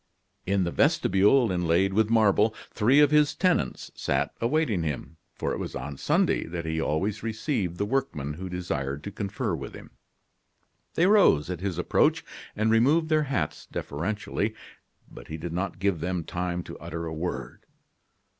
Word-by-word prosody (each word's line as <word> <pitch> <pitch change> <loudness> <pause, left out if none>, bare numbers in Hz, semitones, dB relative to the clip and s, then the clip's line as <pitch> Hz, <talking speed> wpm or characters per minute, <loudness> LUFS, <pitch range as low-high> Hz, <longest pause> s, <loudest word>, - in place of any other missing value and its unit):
In 95 0 +2
the 85 - -1
vestibule, 105 +8 +3
inlaid 90 +2 +2
with 110 +1 +2
marble, 110 -1 +3 0.2
three 125 +7 +4
of 145 -1 +5
his 150 -1 +4
tenants 180 - 0
sat - - -1
awaiting 120 - +1
him, 80 +1 -4 0.2
for - - -2
it - - -4
was - - -5
on 75 -1 -5
Sunday - - +1
that 85 0 -5
he 80 0 -1
always 95 +8 -1
received 110 - -2
the 100 - 0
workmen 105 - -2
who 90 +4 -6
desired 75 -6 -3
to 100 - -5
confer 100 +1 -3
with 70 -4 -5
him. - - -12 1.0
They 170 - +4
rose 185 - +4
at 90 - -4
his 95 -3 -2
approach, 90 - +2 0.3
and 110 +1 +1
removed 145 +9 +3
their 155 -1 +3
hats 85 - -2
deferentially. 105 +6 -3 0.5
But - - -12
he 80 - -5
did 85 +1 -5
not 90 0 -2
give 95 -2 0
them 90 +1 -2
time 90 +2 -3
to - - -10
utter 85 +1 -5
a 80 - -4
word. 85 +3 -5
95 Hz, 165 wpm, -27 LUFS, 85-115 Hz, 1.0 s, of